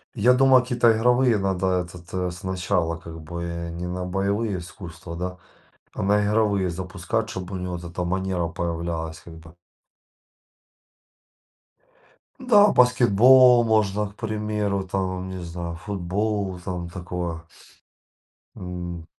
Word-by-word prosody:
Я 120 Hz, +3 st, +4 dB
думаю, 130 Hz, 0 st, +5 dB
какие-то 120 Hz, -2 st, +3 dB
игровые 125 Hz, 0 st, +3 dB
надо 95 Hz, -1 st, 0 dB
этот, 90 Hz, -1 st, -11 dB
э, 90 Hz, -1 st, -1 dB
сначала 90 Hz, -1 st, -1 dB
как 80 Hz, 0 st, -10 dB
бы. 85 Hz, +3 st, -6 dB, 0.3 s
Не 85 Hz, +1 st, -5 dB
на 90 Hz, +1 st, -4 dB
боевые 100 Hz, +2 st, -1 dB
искусства, 85 Hz, -2 st, -9 dB
да, 90 Hz, +1 st, -4 dB, 0.6 s
а -, -, -5 dB
на 105 Hz, +1 st, +3 dB
игровые 100 Hz, -3 st, +1 dB
запускать, 95 Hz, +5 st, -3 dB
чтобы 95 Hz, 0 st, -6 dB
у -, -, -4 dB
него 90 Hz, 0 st, -4 dB
вот 85 Hz, -, -9 dB
эта 85 Hz, +1 st, -4 dB
манера 95 Hz, -1 st, -1 dB
появлялась 85 Hz, -2 st, -4 dB
как 85 Hz, -, -12 dB
бы. 80 Hz, 0 st, -15 dB, 2.8 s
Да, 210 Hz, -6 st, +5 dB
баскетбол 125 Hz, +1 st, +6 dB
можно, 105 Hz, -2 st, +1 dB
к 105 Hz, -, -23 dB
примеру, 105 Hz, -3 st, -2 dB
там, 95 Hz, -1 st, -2 dB
не 95 Hz, -1 st, -6 dB
знаю, 85 Hz, 0 st, -5 dB
футбол, 100 Hz, +1 st, -2 dB
там 90 Hz, -2 st, -4 dB
такое. 90 Hz, -2 st, -5 dB, 1.2 s
М. 85 Hz, -2 st, -6 dB
95 Hz, 125 wpm, -24 LUFS, 85-105 Hz, 2.8 s, баскетбол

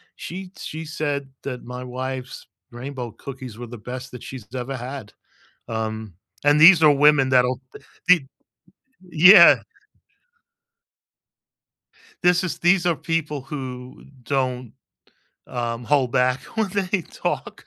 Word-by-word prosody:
She 185 Hz, +1 st, -8 dB
she 160 Hz, +1 st, -7 dB
said 145 Hz, -3 st, -3 dB
that 125 Hz, -3 st, -6 dB
my 125 Hz, +1 st, -7 dB
wife's 130 Hz, +1 st, -6 dB, 0.2 s
rainbow 125 Hz, 0 st, -7 dB
cookies 130 Hz, -1 st, -9 dB
were 120 Hz, -, -7 dB
the 120 Hz, +1 st, -9 dB
best 125 Hz, +4 st, -8 dB
that 125 Hz, -, -10 dB
she's 125 Hz, -6 st, -9 dB
ever 130 Hz, +2 st, -4 dB
had, 125 Hz, -3 st, -7 dB, 0.6 s
um, 110 Hz, -3 st, -4 dB, 0.3 s
and 145 Hz, +1 st, +4 dB
these 165 Hz, 0 st, +8 dB
are 150 Hz, -, +7 dB
women 145 Hz, -1 st, +4 dB
that'll 125 Hz, 0 st, +2 dB
b -, -, -11 dB, 0.3 s
be 175 Hz, -7 st, +5 dB, 0.8 s
Yeah. 175 Hz, +2 st, +8 dB, 2.6 s
This 180 Hz, +1 st, +4 dB
is 175 Hz, -, -4 dB
these 180 Hz, 0 st, +3 dB
are 170 Hz, -2 st, +2 dB
people 150 Hz, -4 st, -3 dB
who 130 Hz, -2 st, -8 dB, 0.2 s
don't, 125 Hz, -3 st, -2 dB, 0.7 s
um, 120 Hz, -1 st, -4 dB
hold 135 Hz, -3 st, +2 dB
back 125 Hz, +1 st, +1 dB, 0.2 s
when 215 Hz, -3 st, +1 dB
they 190 Hz, -1 st, -1 dB
talk, -, -, -5 dB
135 Hz, 125 wpm, -22 LUFS, 125-155 Hz, 2.6 s, these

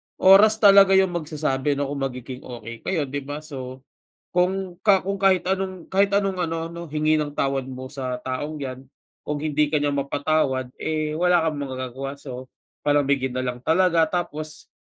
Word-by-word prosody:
oras 200 Hz, +3 st, +7 dB
talaga 195 Hz, -1 st, +8 dB
yung 190 Hz, -1 st, +4 dB
magsasabi 150 Hz, -4 st, -1 dB
'no 140 Hz, 0 st, -2 dB
kung 145 Hz, -, -4 dB
magiging 125 Hz, 0 st, -8 dB
okey 115 Hz, -1 st, -8 dB
kayo, 170 Hz, -5 st, +1 dB
'di 140 Hz, 0 st, -5 dB
ba? 145 Hz, +1 st, -5 dB
So, 130 Hz, -3 st, -8 dB, 0.5 s
kung 185 Hz, +1 st, 0 dB
ka 195 Hz, -3 st, +4 dB
kung 200 Hz, -, -1 dB
kahit 190 Hz, -2 st, +3 dB
anong 190 Hz, -2 st, -2 dB
kahit 195 Hz, +1 st, +2 dB
anong 195 Hz, -2 st, +1 dB
ano 165 Hz, -1 st, -2 dB
'no, 170 Hz, -1 st, -8 dB
hingi 155 Hz, +1 st, +2 dB
ng 150 Hz, -1 st, 0 dB
tawad 135 Hz, -1 st, 0 dB
mo 130 Hz, 0 st, -7 dB
sa 130 Hz, -2 st, -4 dB
taong 140 Hz, +5 st, -4 dB
'yan 130 Hz, -2 st, -6 dB, 0.5 s
kung 150 Hz, 0 st, -1 dB
hindi 150 Hz, -1 st, +1 dB
ka 155 Hz, -, 0 dB
niya 145 Hz, -1 st, +1 dB
mapatawad, 140 Hz, -2 st, 0 dB
eh, 155 Hz, -1 st, -1 dB
wala 175 Hz, +1 st, +3 dB
kang 155 Hz, -3 st, -1 dB
magagawa. 130 Hz, 0 st, -5 dB
So, 130 Hz, -2 st, -9 dB, 0.3 s
palamigin 140 Hz, -3 st, +1 dB
na 130 Hz, -, -1 dB
lang 125 Hz, -1 st, -4 dB
talaga 165 Hz, +2 st, +3 dB
tapos, 155 Hz, -3 st, -5 dB
150 Hz, 175 wpm, -23 LUFS, 135-175 Hz, 0.5 s, talaga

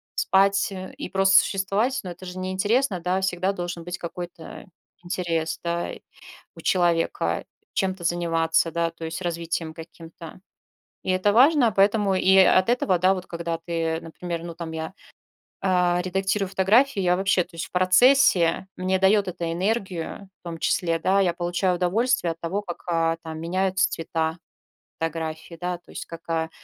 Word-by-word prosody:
спать, 200 Hz, +3 st, +2 dB
э, 185 Hz, -1 st, -7 dB
и -, -, -6 dB
просто 195 Hz, 0 st, +4 dB
существовать, 205 Hz, +7 st, +1 dB
ну, 185 Hz, -, -6 dB
это 175 Hz, +1 st, -9 dB
же 180 Hz, 0 st, -7 dB
неинтересно, 190 Hz, +4 st, 0 dB
да, 180 Hz, +2 st, -1 dB
всегда 190 Hz, 0 st, 0 dB
должен 175 Hz, -2 st, -5 dB
быть 175 Hz, +1 st, -5 dB
какой-то 175 Hz, -1 st, -8 dB, 0.4 s
интерес, 170 Hz, -2 st, -2 dB
да, 170 Hz, 0 st, -2 dB, 0.7 s
у -, -, -11 dB
человека 175 Hz, -2 st, +1 dB, 0.3 s
чем-то 190 Hz, -2 st, -2 dB
заниматься, 165 Hz, -1 st, +1 dB
да, 170 Hz, +1 st, 0 dB
то 165 Hz, 0 st, -10 dB
есть 160 Hz, +3 st, -5 dB
развитием 170 Hz, -2 st, -3 dB
каким-то. 165 Hz, +1 st, -11 dB, 0.6 s
И -, -, -1 dB
это 185 Hz, +2 st, +2 dB
важно, 255 Hz, 0 st, +5 dB
поэтому 200 Hz, 0 st, +3 dB
и 190 Hz, +1 st, +4 dB
от 185 Hz, +1 st, +5 dB
этого, 225 Hz, -7 st, +2 dB
да, 185 Hz, +2 st, +4 dB
вот 185 Hz, -1 st, -6 dB
когда 170 Hz, -1 st, -4 dB
ты, 165 Hz, -1 st, -1 dB
например 170 Hz, +1 st, -6 dB
ну, 170 Hz, -1 st, -7 dB
там 165 Hz, -1 st, -6 dB
я, 160 Hz, +2 st, -5 dB, 0.7 s
а, 180 Hz, -2 st, +2 dB
редактирую 190 Hz, +2 st, -1 dB
фотографии, 205 Hz, +5 st, +3 dB
я 180 Hz, -1 st, +3 dB
вообще, 190 Hz, -1 st, +2 dB
то -, -, -25 dB
есть 165 Hz, -, -4 dB
в -, -, -16 dB
процессе 185 Hz, -2 st, +4 dB
мне 185 Hz, +1 st, +1 dB
дает 195 Hz, +1 st, +4 dB
это 170 Hz, -2 st, -3 dB
энергию 190 Hz, 0 st, -3 dB
в -, -, -65 dB
том 170 Hz, -1 st, -6 dB
числе, 165 Hz, 0 st, 0 dB
да, 190 Hz, +4 st, +2 dB
я 180 Hz, -3 st, +2 dB
получаю 175 Hz, +1 st, 0 dB
удовольствие 185 Hz, +2 st, +1 dB
от 165 Hz, -, -9 dB
того, 175 Hz, +5 st, -2 dB
как, 175 Hz, -4 st, -8 dB
а, 165 Hz, -1 st, +1 dB
там 160 Hz, -1 st, -6 dB
меняются 185 Hz, +3 st, +1 dB
цвета 160 Hz, 0 st, -2 dB, 0.6 s
фотографии, 165 Hz, 0 st, -4 dB
да, 180 Hz, 0 st, -2 dB
то 175 Hz, -, -28 dB
есть -, -, -6 dB
как, 165 Hz, 0 st, -10 dB
а, 160 Hz, -1 st, -1 dB
180 Hz, 165 wpm, -24 LUFS, 165-190 Hz, 0.7 s, важно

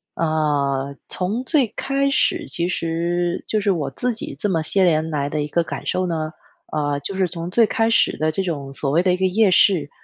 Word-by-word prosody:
呃， 140 Hz, -4 st, 0 dB
从 205 Hz, +7 st, -1 dB
最 280 Hz, -6 st, +3 dB
开 275 Hz, 0 st, 0 dB
始 325 Hz, +3 st, +1 dB
其 170 Hz, 0 st, 0 dB
实 175 Hz, 0 st, -1 dB
就 215 Hz, -, +1 dB
是 200 Hz, -1 st, +2 dB
我 150 Hz, -6 st, -1 dB
自 245 Hz, -, -1 dB
己 220 Hz, -, -6 dB
这 205 Hz, -, -1 dB
么 165 Hz, -3 st, +1 dB
些 190 Hz, +5 st, +2 dB
年 160 Hz, -2 st, +2 dB
来 145 Hz, -2 st, -1 dB
的 150 Hz, 0 st, -2 dB
一 145 Hz, -, -2 dB
个 170 Hz, +3 st, +1 dB
感 -, -, -6 dB
受 185 Hz, -, 0 dB
呢， 160 Hz, -2 st, -3 dB, 0.4 s
呃， 145 Hz, -1 st, 0 dB
就 190 Hz, +7 st, -4 dB
是 190 Hz, 0 st, +2 dB
从 170 Hz, 0 st, -6 dB
最 230 Hz, +4 st, +4 dB
开 225 Hz, +2 st, +1 dB
始 230 Hz, -, +3 dB
的 155 Hz, +1 st, +1 dB
这 195 Hz, -, -1 dB
种 145 Hz, -7 st, -4 dB
所 135 Hz, 0 st, -2 dB
谓 165 Hz, -, +3 dB
的 180 Hz, -1 st, +3 dB
一 -, -, 0 dB
个 190 Hz, -, +1 dB
夜 200 Hz, +2 st, +3 dB
市， 170 Hz, -5 st, +4 dB
170 Hz, 240 characters per minute, -21 LUFS, 155-195 Hz, 0.4 s, 最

